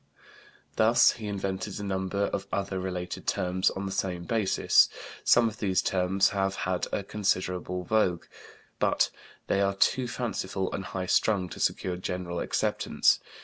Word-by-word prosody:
He -, -, 0 dB
also 120 Hz, +2 st, +5 dB
invented 100 Hz, -1 st, -3 dB
a -, -, -5 dB
number 95 Hz, 0 st, -1 dB
of 100 Hz, -, -3 dB
other 95 Hz, -1 st, -2 dB
related 90 Hz, -1 st, -5 dB
terms 90 Hz, +1 st, +1 dB
on 95 Hz, -, -5 dB
the 95 Hz, -, -3 dB
same 95 Hz, -2 st, -2 dB
basis; 105 Hz, 0 st, +3 dB, 0.3 s
some 120 Hz, -1 st, +5 dB
of 110 Hz, 0 st, -6 dB
these 95 Hz, -3 st, +1 dB
terms 95 Hz, +1 st, +2 dB
have 95 Hz, -1 st, -1 dB
had 90 Hz, -1 st, -1 dB
a 100 Hz, -, -1 dB
considerable 90 Hz, -3 st, -1 dB
vogue, 90 Hz, -3 st, +1 dB, 0.5 s
but -, -, +2 dB, 0.3 s
they 100 Hz, -, +1 dB
are 100 Hz, 0 st, +1 dB
too 125 Hz, +5 st, +2 dB
fanciful 95 Hz, -6 st, -3 dB
and 95 Hz, -, -4 dB
high 90 Hz, +1 st, -4 dB
strung 95 Hz, 0 st, +2 dB
to -, -, -9 dB
secure 90 Hz, -1 st, 0 dB
general 90 Hz, -1 st, -4 dB
acceptance. -, -, +1 dB
95 Hz, 150 wpm, -28 LUFS, 90-100 Hz, 0.5 s, also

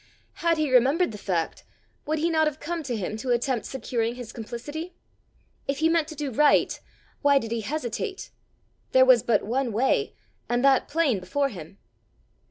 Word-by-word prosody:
Had 335 Hz, -1 st, +2 dB
he 305 Hz, -3 st, 0 dB
remembered 270 Hz, +6 st, +4 dB
the 210 Hz, -, -8 dB
fact, 175 Hz, -5 st, -2 dB, 0.4 s
would 310 Hz, +1 st, 0 dB
he 330 Hz, +2 st, 0 dB
not 315 Hz, -1 st, +3 dB
have 305 Hz, 0 st, -3 dB
come 335 Hz, +2 st, -3 dB
to 255 Hz, -6 st, -3 dB
him 210 Hz, +2 st, -3 dB
to 250 Hz, +4 st, -5 dB
attempt 245 Hz, 0 st, 0 dB
securing 240 Hz, -3 st, -2 dB
his 245 Hz, -2 st, -8 dB
complicity? 290 Hz, +10 st, -7 dB, 0.7 s
If 275 Hz, 0 st, -1 dB
he 320 Hz, +3 st, +2 dB
meant 330 Hz, -2 st, +2 dB
to 315 Hz, -, -8 dB
do 290 Hz, -2 st, -3 dB
right, 295 Hz, +5 st, +3 dB, 0.4 s
why 285 Hz, -1 st, +5 dB
did 230 Hz, -4 st, -2 dB
he 230 Hz, -1 st, -1 dB
hesitate? 310 Hz, -, -4 dB, 0.6 s
there 260 Hz, 0 st, +7 dB
was 255 Hz, -3 st, +6 dB
but 220 Hz, -2 st, +1 dB
one 245 Hz, +3 st, -1 dB
way, 240 Hz, +6 st, +1 dB, 0.3 s
and 240 Hz, +2 st, +1 dB
that 270 Hz, -1 st, +4 dB
plain 290 Hz, -9 st, +1 dB
before 275 Hz, +10 st, -1 dB
him! 180 Hz, -, -10 dB
265 Hz, 180 wpm, -26 LUFS, 230-310 Hz, 0.7 s, there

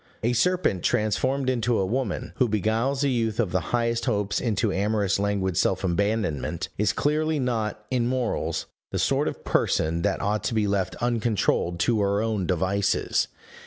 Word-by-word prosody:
A 120 Hz, +2 st, +2 dB
serpent 175 Hz, -, +1 dB
transformed 130 Hz, +8 st, +1 dB
into 120 Hz, -2 st, +1 dB
a 95 Hz, -, +1 dB
woman, 115 Hz, 0 st, -2 dB
who 125 Hz, -5 st, +2 dB
beguiles 115 Hz, +7 st, 0 dB
a 140 Hz, -, +2 dB
youth 115 Hz, -3 st, 0 dB
of 105 Hz, -7 st, +1 dB
the 95 Hz, -, +2 dB
highest 115 Hz, -1 st, 0 dB
hopes 105 Hz, -4 st, 0 dB
into 110 Hz, -3 st, 0 dB
amorous 100 Hz, -1 st, +1 dB
languid 100 Hz, -3 st, 0 dB
self 95 Hz, 0 st, +1 dB
abandonment, 100 Hz, -3 st, -1 dB
is 105 Hz, -1 st, +2 dB
clearly 155 Hz, +1 st, 0 dB
not, 110 Hz, -5 st, -2 dB
in 120 Hz, -2 st, +1 dB
morals, 125 Hz, -2 st, -1 dB, 0.2 s
the -, -, -3 dB
sort -, -, +1 dB
of -, -, -5 dB
person 80 Hz, +2 st, +1 dB
that -, -, 0 dB
ought 105 Hz, +1 st, -1 dB
to 115 Hz, -, -1 dB
be 110 Hz, -1 st, +2 dB
left 100 Hz, -2 st, 0 dB
uncontrolled 110 Hz, -7 st, +1 dB
to 110 Hz, +2 st, +2 dB
her 100 Hz, 0 st, +1 dB
own 105 Hz, -4 st, -1 dB
devices. 95 Hz, +3 st, +1 dB
110 Hz, 165 wpm, -25 LUFS, 100-120 Hz, 0.2 s, A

